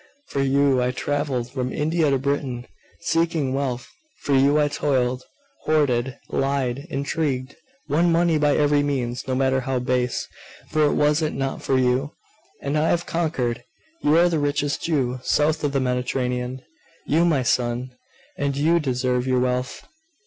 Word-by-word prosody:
For 140 - -1
you 135 -1 +3
I 125 - +1
travelled 130 -2 -2
from 130 -1 -3
India 160 +1 +1
to 135 - +3
Britain, 135 -2 -2 0.4
seeking 165 -5 0
wealth. 130 -3 -2 0.4
For 145 - 0
you 140 +3 +4
I 150 - +3
toiled, 130 -3 0 0.4
hoarded, 135 -5 +1
lied, 135 +1 -1
intrigued, 140 -2 -2 0.3
won 165 +4 +2
money 165 -1 +3
by 145 -1 +3
every 145 -1 +3
means, 130 -3 -2
no 130 - 0
matter 130 0 +2
how 130 0 -2
base 125 0 -1 0.4
for 155 -1 +3
was 150 +1 +2
it 155 - -1
not 135 0 -3
for 135 - +1
you? 130 +3 +1 0.5
And 140 +2 0
I 160 - +2
have 175 0 +1
conquered! 145 -8 -1 0.4
You 150 +2 +4
are 175 +1 +6
the 165 -3 0
richest 145 0 -1
Jew 130 -6 0
south 150 +4 +1
of 145 - +1
the 140 - +1
Mediterranean, 125 0 -2 0.4
you, 160 +3 +2
my 155 -7 +2
son! 120 +1 0 0.5
And 140 -1 -1
you 165 +4 +3
deserve 125 -3 0
your 130 -1 +2
wealth. 125 0 -2
135 Hz, 155 wpm, -23 LUFS, 125-150 Hz, 0.5 s, are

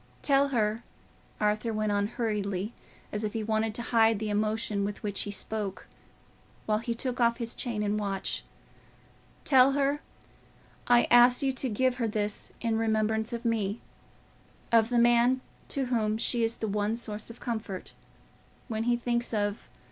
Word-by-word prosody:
Tell 280 0 +4
her," 225 -3 0 0.6
Arthur 215 +2 +1
went 215 -1 -1
on 205 0 +1
hurriedly, 210 -3 -2 0.4
as 210 +1 -3
if 210 - -2
he 225 - -2
wanted 220 0 0
to 240 - -2
hide 225 -1 +5
the 210 0 -3
emotion 215 0 0
with 205 +1 -4
which 205 -2 -1
he - - -3
spoke, 205 -2 -4 0.8
while 215 0 +1
he 235 0 -3
took 250 +1 -3
off 235 0 +3
his 235 -1 -3
chain 225 -4 -2
and 210 +1 0
watch, 195 -2 -2 1.0
"tell 265 0 +6
her 285 +1 +1 0.9
I 240 0 +6
asked 245 +2 +7
you 270 -1 +1
to 260 0 -1
give 250 +3 +1
her 235 -3 0
this 210 -1 -2
in 225 -2 0
remembrance 220 0 0
of 235 +1 -5
me—of 225 +1 -2
the 245 - +1
man 240 +2 +4 0.3
to 275 -2 -1
whom 220 -3 0
she 235 +1 +1
is 225 +1 0
the 220 - -3
one 210 +2 0
source 215 -2 -3
of 230 - -11
comfort, 220 -5 -5 0.8
when 220 0 -2
he 240 0 +2
thinks 235 -1 -1
of... 205 0 -2
225 Hz, 165 wpm, -29 LUFS, 210-240 Hz, 1.0 s, asked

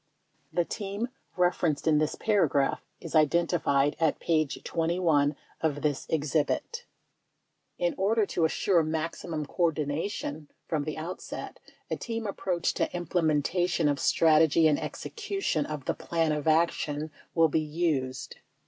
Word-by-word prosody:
The 175 - +1
"team" 205 +5 -4 0.3
referenced 175 -4 +1
in 155 -2 +4
this 155 0 0
paragraph 155 -10 +2 0.2
is - - -8
identified 155 -3 +3
at 160 -2 +2
p. 155 -2 +2
21 160 -2 +1 0.3
of 145 -3 -1
this 145 -3 -1
exhibit: 160 - -1 0.9
In 175 -1 +1
order 215 +3 +3
to 175 - -1
assure 170 +2 +2
maximum 160 0 -3
coordination 155 -1 -2 0.2
from 150 -3 -1
the 155 - -4
out 170 +4 -5
set - - -7 0.3
a - - 0
team 230 -1 -4
approach 185 -4 -1
to - - -1
implementation 175 0 +1
of 145 -1 +1
strategy 160 0 +4
and 150 -2 +2
execution 395 - -2
of 150 -3 -5
the - - +1
plan 165 -2 0
of 150 0 -2
action 155 -1 +1 0.2
will 165 -1 +5
be 155 - +1
used. 150 -5 -2
160 Hz, 130 wpm, -28 LUFS, 150-175 Hz, 0.9 s, will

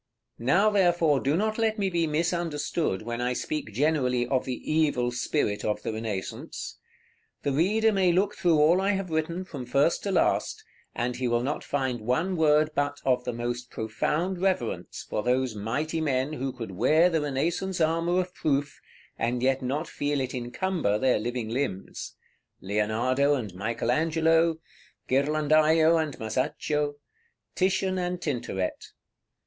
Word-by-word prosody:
§ - - -59 0.4
XXI. - - -7
Now, 200 +9 +4
therefore, 175 -7 +3
do 140 +5 +1
not 215 +3 0
let 220 -1 +1
me 200 -2 +1
be 170 -3 0
misunderstood 160 - -1
when 120 +1 -4
I 125 +1 0
speak 150 -2 -3
generally 125 -1 +1
of 130 +1 0
the 125 -2 -3 0.2
evil 145 -6 +2
spirit 120 -3 -1
of 105 0 -1
the - - -2
Renaissance. 110 -4 -5 0.6
The 140 - 0
reader 210 +10 +3
may 190 -3 +3
look 195 +4 +2
through 170 -3 +3
all 160 +5 +4
I 200 +1 +2
have 190 -3 -3
written, 165 +4 -1
from 140 -8 -7
first 140 +6 +2
to 200 - -2
last, 185 - +1 0.3
and 120 +1 -2
he 125 - -1
will 120 0 +1
not 145 +4 -2
find 130 -4 -2
one 160 - 0
word 155 -1 +3
but 145 0 -1
of 125 -2 +2
the 125 - -1
most 120 +1 -4
profound 160 - -2
reverence 120 - -1
for - - -2
those 125 +1 +1
mighty 140 +10 -2
men 135 -1 0
who 135 -2 -3
could 115 -5 -7
wear 155 - +4
the 165 -3 +1
Renaissance 170 +7 -1
armor 165 +2 +2
of 180 0 -7
proof, 140 -3 -1 0.4
and 120 +1 -1
yet 135 +1 +2
not 140 +6 -2
feel 145 0 -1
it 130 -1 -3
encumber 125 - -1
their 130 0 +2
living 120 0 -3
limbs, 115 -6 -4 0.4
Leonardo 115 +8 +1
and 110 -8 -4
Michael 115 +5 -2
Angelo, 160 +2 +2 0.5
Ghirlandajo 155 +3 +3
and 150 -3 -4
Masaccio, 145 +6 -1 0.6
Titian 190 0 +1
and 180 0 -2
Tintoret. 120 - -3
145 Hz, 160 wpm, -27 LUFS, 125-170 Hz, 0.6 s, Now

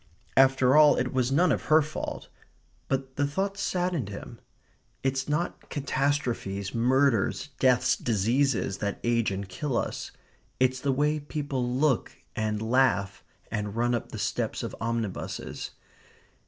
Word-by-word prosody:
After 135 0 +5
all, 150 -1 +7
it - - -1
was 130 0 +1
none 170 +6 +4
of - - -1
her 155 0 +5
fault. 150 +1 -5 0.6
But 135 0 -2
the 145 0 +2
thought 195 +7 -2
saddened 180 - -1
him. 100 - -8 0.6
It's 135 +1 -1
not 150 +4 -2
catastrophes, 130 -9 -1
murders, 130 +1 +2
deaths, 125 -2 +4
diseases, 115 -1 +1
that 100 -1 -2
age 120 -1 +2
and 100 0 -4
kill 120 +7 -2
us; - - -3 0.5
it's 130 0 +2
the 140 +1 0
way 150 +3 +1
people 145 -4 -3
look 135 0 +1 0.2
and 110 0 -1
laugh, 110 -5 +2 0.3
and 105 -1 -3
run 120 +1 +1
up 120 - -3
the - - -6
steps - - -2
of - - -5
omnibuses. 115 -3 -3
130 Hz, 140 wpm, -27 LUFS, 115-145 Hz, 0.6 s, all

